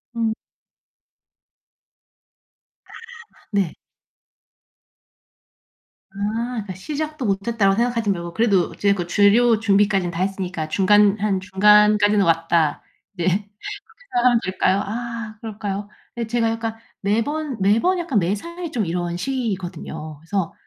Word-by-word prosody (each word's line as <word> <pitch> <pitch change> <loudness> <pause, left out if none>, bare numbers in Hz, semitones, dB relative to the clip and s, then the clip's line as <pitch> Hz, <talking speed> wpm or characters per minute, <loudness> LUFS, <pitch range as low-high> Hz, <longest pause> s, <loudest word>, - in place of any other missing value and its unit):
음. 225 -1 0 2.5
아 - - -28 0.6
네. 195 -5 0 2.4
아, 195 - -28 0.5
그러니까 190 -2 -7
'시작도 305 +5 -4
못 195 +1 -1
했다.'라고 200 -4 +2
생각하지 235 -2 0
말고. 170 -2 -4
'그래도 200 -6 +2
어찌 205 - -3
됐건 185 -4 +2
재료 215 +4 +4
준비까지는 200 -4 +2
다 170 +2 -4
했으니까 185 -4 -2
중간 205 +3 +4
한 200 -2 +1
중간까지는 210 +1 +4
왔다.' 165 -2 +2 0.3
네 175 -3 -3
그렇게 200 +3 +1 0.6
생각하면 245 -1 +3
될까요? 185 +1 +1
아, 230 0 -5
그럴까요? 205 -2 -4 0.3
예. 230 -1 -2
제가 230 -1 +1
약간 225 0 -3 0.3
매번 250 +7 -1
매번 230 - +3
약간 280 -11 +1
매사에 330 - -3
좀 220 -6 -1
이런 175 0 -2
식이거든요. 180 - -4
그래서 170 +1 -3
205 Hz, 265 characters per minute, -22 LUFS, 185-230 Hz, 2.5 s, 재료